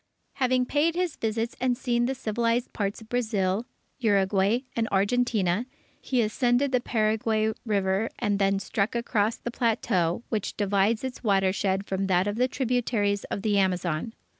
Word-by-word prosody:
Having 255 -1 +2
paid 310 +5 +1
his 360 -3 -1
visits 225 +1 -2
and 250 -1 +1
seen 240 -2 0
the 265 - -1
civilized 235 +1 -1
parts 200 +1 -2
of 220 - -14
Brazil, 215 -3 0 0.3
Uruguay, 200 +1 +2
and 230 -1 0
Argentina, 205 0 +1 0.3
he 250 -3 +1
ascended 245 +4 +1
the 250 -1 +2
Paraguay 220 -1 +1
River, 200 +1 +1
and 205 -1 0
then 195 0 +2
struck 200 +2 -1
across 225 -2 +1
the 240 - -6
plateau 220 -5 0
which 215 -4 -3
divides 205 +2 +1
its 260 -1 -5
watershed 195 -1 +1
from 195 0 -2
that 185 0 +2
of 205 +1 -2
the 250 +1 +3
tributaries 235 -6 0
of 200 - -5
the 205 -2 +2
Amazon. 180 +2 -1
220 Hz, 155 wpm, -26 LUFS, 195-240 Hz, 0.3 s, the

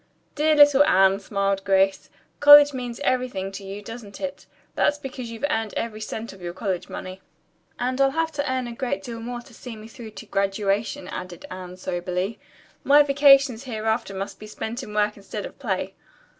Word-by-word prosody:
"Dear 305 +1 +2
little 290 -1 +7
Anne," 195 -9 +4
smiled 195 -1 -1
Grace. 195 0 +2 0.3
"College 290 0 +9
means 245 -2 -5
everything 250 -8 -1
to 195 0 -8
you, 195 +2 -7
doesn't 225 -2 -9
it? 280 -1 -6 0.3
That's 295 - +2
because 260 -4 -7
you've 230 +4 -3
earned 225 -7 -2
every 220 -2 -4
cent 220 +1 -6
of 195 - -15
your 175 0 -5
college 190 -4 -3
money." 185 +1 -7 0.6
"And 255 +2 -1
I'll 270 - +5
have 320 +3 -1
to 285 -3 -2
earn 260 -1 -1
a 240 - -6
great 235 -5 -3
deal 230 0 -6
more 240 +1 -5
to 240 0 -18
see 235 +1 -9
me 215 0 -11
through 225 0 -10
to 205 -2 -11
graduation," 200 +6 -1
added 180 -2 -7
Anne 185 -1 -8
soberly. 180 +3 -3 0.4
"My 290 +1 +6
vacations 275 -3 +5
hereafter 220 -3 -2
must 195 +1 -5
be 215 - -10
spent 220 +3 -5
in 250 - -9
work 210 0 +1
instead 200 +1 -6
of - - -11
play." 195 -6 -2
225 Hz, 185 wpm, -24 LUFS, 195-260 Hz, 0.6 s, College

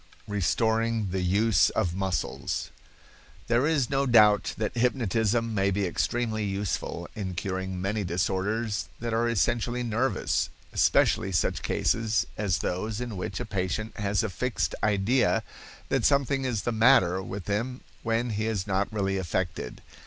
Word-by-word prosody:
Restoring 110 +2 +1
the 95 0 -1
Use 100 +3 +3
of 85 -2 0
Muscles.—There 100 +6 -3
is 150 -6 +2
no 135 0 +1
doubt 105 -4 +5
that 110 +1 -2
hypnotism 115 -2 +1
may 100 -1 +2
be 100 +1 0
extremely 110 +4 -1
useful 95 -3 -3
in 95 -4 -4
curing 95 0 -3
many 100 +3 -1
disorders 95 - -1
that 115 -1 -3
are 115 +1 +2
essentially 120 +2 0
nervous, 120 +3 0 0.2
especially 95 - +3
such 85 - 0
cases 115 -1 +1
as 100 -4 0
those 105 +4 -2
in 120 -3 -4
which 90 - -4
a - - -3
patient 100 +2 -3
has 100 -1 0
a 110 - -1
fixed 125 +5 -1
idea 110 +3 +2 0.5
that - - +1
something 140 -1 +2
is 120 -5 -1
the 120 - 0
matter 110 -6 +4
with 95 0 -6
him 115 +6 -2 0.2
when 115 +1 0
he 110 +1 -1
is 105 -4 -1
not 100 0 0
really 95 -2 -1
affected. 85 -7 -3
105 Hz, 145 wpm, -27 LUFS, 95-115 Hz, 0.5 s, doubt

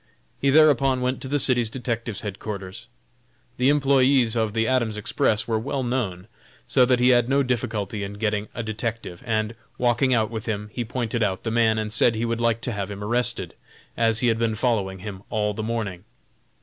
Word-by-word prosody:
He 140 - +2
thereupon 135 -3 +4
went 125 +1 -1
to - - -6
the 145 +2 0
city 125 -3 +4
detective's 115 -2 -2
headquarters. 100 +1 -6 0.7
The 125 +2 +3
employés 135 -4 +3
of 110 -2 0
the 115 0 +1
Adams 120 -5 0
Express 105 +1 0
were 110 -1 0
well 135 +3 -3
known, 110 -7 -2 0.4
so 130 -2 +4
that 125 0 +2
he 125 +1 +4
had 120 -1 +4
no 140 +1 +3
difficulty 110 -5 -2
in 100 +1 -5
getting 105 0 -2
a 115 - -3
detective, 110 -4 -5
and, 110 0 0 0.2
walking 125 +2 +2
out 110 -3 +2
with 110 0 -6
him, 105 -1 -3
he 120 - -2
pointed 120 -1 -3
out 95 -3 -1
the 115 - -2
man, 115 -1 +3
and 105 -1 -2
said 115 +1 +3
he 115 +2 -1
would 115 0 -2
like 115 -1 +1
to 125 - -3
have 100 -3 -4
him 100 0 -6
arrested, 120 -5 0 0.4
as 115 -1 +3
he 125 - +2
had 115 0 0
been 115 -1 0
following 105 -5 0
him 100 -3 -7
all 105 -2 0
the 110 - -5
morning. 110 -5 -3
115 Hz, 200 wpm, -24 LUFS, 105-125 Hz, 0.7 s, thereupon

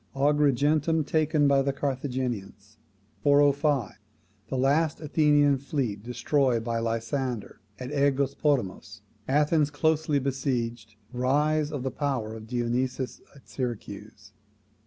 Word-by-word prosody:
Agrigentum 150 +2 +2
taken 155 -1 +2
by 140 -1 +4
the 140 0 0
Carthaginians. 125 -7 -4 0.4
405. 145 -4 +2 0.5
The 130 - -3
last 145 +4 +2
Athenian 145 -2 +3
fleet 130 -7 -3
destroyed 125 +1 0
by 115 0 -1
Lysander 115 +1 -3 0.2
at 125 +1 -7
AEgospotamos. 140 - 0 0.3
Athens 150 +2 +2
closely 155 0 +1
besieged. 120 -5 -2 0.2
Rise 150 +4 +1
of 145 -4 -4
the 130 - -2
power 130 -6 -2
of 110 0 -10
Dionysius 125 +1 -2
at 140 - -18
Syracuse. 105 -4 -6
135 Hz, 105 wpm, -27 LUFS, 120-145 Hz, 0.5 s, by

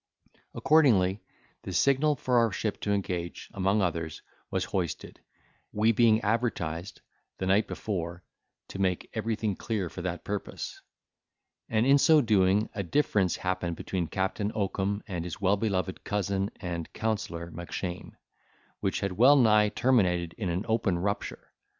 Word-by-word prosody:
Accordingly, 110 -11 +4 0.4
the - - -7
signal 140 - +3
for 125 -2 +2
our 115 -2 +3
ship 105 +1 -3
to 105 - -1
engage, 90 -4 -3
among 100 +2 +1
others, 85 -3 -3 0.3
was 95 -1 -1
hoisted, 90 -4 -4 0.5
we 110 +2 +3
being 115 -1 +4
advertised, 100 -6 -2 0.4
the 95 - -3
night 100 +3 +3
before, 85 -4 -4 0.5
to 95 - -7
make 90 -2 -1
everything 110 -2 -1
clear 105 -5 -3
for 90 - -7
that 90 0 -4
purpose; 105 -1 -5 0.9
and, 110 +1 +2
in 140 +1 +6
so 155 +2 +6
doing, 105 -3 +3
a 100 - -2
difference 100 - +1
happened 90 -2 -2
between 90 -1 -3
Captain 95 +4 -1
Oakum 100 0 -1
and 90 -5 -3
his 85 -1 -6
well 100 0 +3
beloved 95 -3 -2
cousin 100 -1 -1
and 85 -3 -5
counsellor 95 -6 -3
Mackshane, 85 +1 -6 0.7
which - - -1
had 100 - -1
well 125 +10 +6
nigh 105 -5 +5
terminated 90 -9 +2
in 100 -5 -3
an 90 +5 -2
open 110 -5 +1
rupture. 100 +3 -3
100 Hz, 145 wpm, -28 LUFS, 90-110 Hz, 0.9 s, in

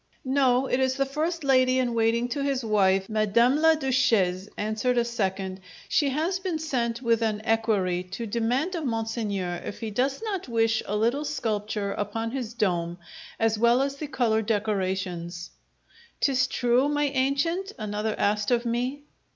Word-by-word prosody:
"No. 260 -1 +3
It 260 - 0
is 260 0 +1
the 275 0 +1
first 310 +4 -2
lady 255 -1 +4
in 250 -2 +1
waiting 230 +1 +2
to 280 +3 -2
his 275 -3 -1
wife, 195 -3 +2
Madame 220 +5 +3
la 320 +1 +5
Duchesse," 230 -10 +1
answered 220 +4 0
a 235 - +3
second. 190 -5 -2 0.3
"She 285 - +2
has 325 +7 -1
been 370 -4 -2
sent 245 -6 -2
with 230 -1 +2
an 215 -2 0
equerry 215 -6 +1
to 195 +6 -6
demand 240 - 0
of 335 -3 -3
monseigneur 220 -7 -2
if - - -6
he 225 -1 -4
does 265 +6 0
not 395 -7 -3
wish 225 -2 +1
a 210 - -1
little 235 +7 +1
sculpture 210 -7 -2
upon 225 +3 -3
his 240 -3 -4
dome 175 -6 0 0.4
as 225 -1 +1
well 235 +2 +4
as 275 +1 -1
the 300 - -5
colour 230 -5 +1
decorations!" 190 -5 -2 0.7
"'Tis 260 -2 +2
true, 245 +3 +2
my 295 0 +1
ancient?" 280 +9 0
another 215 -1 -2
asked 210 0 +1
of 240 -1 +1
me. 250 +5 -2
235 Hz, 165 wpm, -26 LUFS, 210-270 Hz, 0.7 s, la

